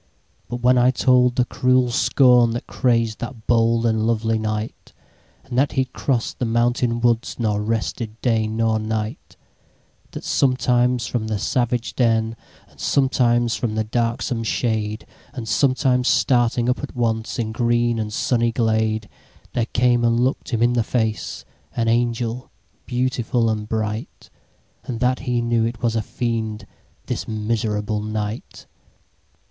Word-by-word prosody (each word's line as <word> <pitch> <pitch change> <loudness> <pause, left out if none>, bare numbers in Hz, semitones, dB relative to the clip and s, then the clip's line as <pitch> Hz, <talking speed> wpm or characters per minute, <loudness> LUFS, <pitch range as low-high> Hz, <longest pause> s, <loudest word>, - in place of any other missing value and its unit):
But 120 0 -5
when 125 0 +5
I 125 +1 +5
told 125 -1 +3
the 125 - +2
cruel 125 0 +2
scornThat 120 -1 +3
crazed 115 +1 0
that 120 -2 -7
bold 115 0 +2
and 110 -1 +1
lovely 115 -1 +1
Knight, 110 0 -4 0.5
And 130 -2 -7
that 140 - +2
he 130 -1 +1
cross'd 125 -1 -2
the 125 - 0
mountain 120 +1 +1
woods, 120 -1 +1
Nor 105 -3 0
rested 110 +1 -3
day 115 -3 +1
nor 110 0 0
night; 110 0 -4 0.7
That - - -8
sometimes 125 -2 +2
from 110 0 -2
the 110 -1 -1
savage 120 +2 -1
den, 115 -2 +1 0.3
And - - -24
sometimes 120 -3 +2
from 110 -3 -2
the 110 - +1
darksome 115 +1 -1
shade, 110 -1 -1 0.3
And 120 -3 -6
sometimes 130 0 +2
starting 120 -1 +2
up 125 +1 +1
at 145 - -7
onceIn 115 -1 -1
green 120 0 +1
and 105 -1 -3
sunny 115 +2 +1
glade, 110 -2 0 0.5
There 115 -2 0
came 120 0 +2
and 115 0 +2
look'd 130 +3 0
him 115 -1 0
in 120 +1 +3
the 120 - +2
faceAn 110 -1 -2 0.4
angel 120 +1 0 0.4
beautiful 125 -2 0
and 105 -1 -4
bright; 110 0 -4 0.5
And 115 -3 -5
that 125 +1 +1
he 125 -1 -1
knew 115 -1 +1
it 115 +1 -3
was 115 -1 +1
a 110 - +1
Fiend, 115 -2 -3 0.4
This - - -4
miserable 105 -1 -1
Knight! 110 +1 -5
115 Hz, 140 wpm, -21 LUFS, 110-125 Hz, 0.7 s, when